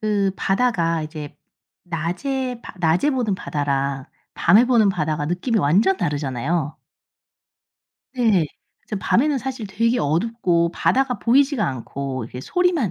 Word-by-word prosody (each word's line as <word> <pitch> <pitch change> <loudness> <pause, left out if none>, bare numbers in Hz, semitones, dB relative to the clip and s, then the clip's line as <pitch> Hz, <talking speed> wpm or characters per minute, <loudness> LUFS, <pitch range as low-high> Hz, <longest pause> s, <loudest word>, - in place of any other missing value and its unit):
그 205 -2 +1
바다가 190 -7 +1
이제 155 -1 -7 0.5
낮에 235 - -3
바 - - -10
낮에 175 - +2
보는 245 -7 0
바다랑 140 -4 -2 0.3
밤에 205 +8 +5
보는 235 -5 +4
바다가 155 -4 -2
느낌이 180 - 0
완전 200 - +3
다르잖아요. 145 - -2 1.4
네. 220 -10 +3 0.3
그래서 210 - -6
밤에는 280 +3 +2
사실 260 -4 -5
되게 230 +5 +1
어둡고 170 0 +1
바다가 260 +4 +1
보이지가 270 -1 +3
않고 130 0 -5
이렇게 125 +2 -8
소리만 345 - +1
190 Hz, 290 characters per minute, -22 LUFS, 155-245 Hz, 1.4 s, 밤에